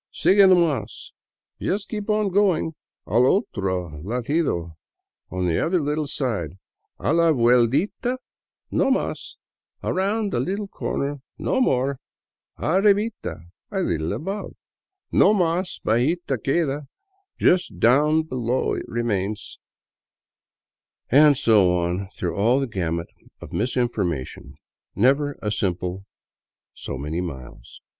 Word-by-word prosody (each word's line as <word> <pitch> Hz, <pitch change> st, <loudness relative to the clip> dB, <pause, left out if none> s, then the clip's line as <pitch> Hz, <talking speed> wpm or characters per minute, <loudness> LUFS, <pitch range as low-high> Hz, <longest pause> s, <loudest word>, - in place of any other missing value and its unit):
Sigue 195 Hz, 0 st, +5 dB
no 185 Hz, -, +7 dB
mas 140 Hz, -, -1 dB, 0.2 s
— -, -, -40 dB
Just 200 Hz, +1 st, -1 dB
keep 210 Hz, -1 st, -5 dB
on 210 Hz, -1 st, +2 dB
going; 185 Hz, -4 st, +2 dB, 0.3 s
Al 120 Hz, +3 st, +3 dB
otro 95 Hz, -, -1 dB
ladito 120 Hz, -, -1 dB, 0.3 s
— -, -, -62 dB
On 90 Hz, 0 st, -2 dB
the 85 Hz, -2 st, +1 dB
other 175 Hz, +2 st, +1 dB
little 150 Hz, 0 st, -1 dB
side; 110 Hz, -, -2 dB, 0.4 s
A -, -, 0 dB
la 170 Hz, -1 st, +4 dB
vueltita 130 Hz, -, +2 dB, 0.5 s
no -, -, +2 dB
mas 270 Hz, -, -2 dB, 0.2 s
— -, -, -46 dB
Around 200 Hz, +2 st, 0 dB
the -, -, 0 dB
little 200 Hz, +3 st, -2 dB
corner 145 Hz, -6 st, -3 dB, 0.2 s
no 260 Hz, -, 0 dB
more; 135 Hz, -, +1 dB, 0.6 s
Arribita 200 Hz, -, +1 dB
— -, -, -55 dB
A -, -, -8 dB
Httle 85 Hz, -, -1 dB
above; 195 Hz, +6 st, -5 dB, 0.6 s
No 205 Hz, +3 st, +5 dB
mas 180 Hz, 0 st, 0 dB
bajita 135 Hz, +4 st, +1 dB
queda 145 Hz, -1 st, 0 dB, 0.2 s
— 390 Hz, 0 st, -45 dB
Just 175 Hz, -, +2 dB
down 150 Hz, +8 st, +4 dB
below 130 Hz, -4 st, -1 dB
it -, -, -4 dB
remains 105 Hz, -3 st, -3 dB, 0.5 s
" -, -, -71 dB
— -, -, -63 dB
and 145 Hz, +1 st, +6 dB
so 100 Hz, -7 st, +4 dB
on 90 Hz, +3 st, -2 dB
through 90 Hz, -3 st, -4 dB
all 115 Hz, +6 st, +3 dB
the 135 Hz, -, 0 dB
gamut 85 Hz, -7 st, -3 dB, 0.3 s
of -, -, -11 dB
misinforma 110 Hz, -, -1 dB
tion; -, -, -12 dB, 0.4 s
never 140 Hz, +5 st, +2 dB
a 105 Hz, -, -1 dB
simple 90 Hz, 0 st, -2 dB, 0.3 s
" -, -, -71 dB, 0.3 s
So 70 Hz, -, -6 dB
many 75 Hz, +5 st, -3 dB
miles." 65 Hz, -8 st, -9 dB
130 Hz, 135 wpm, -23 LUFS, -, 0.6 s, no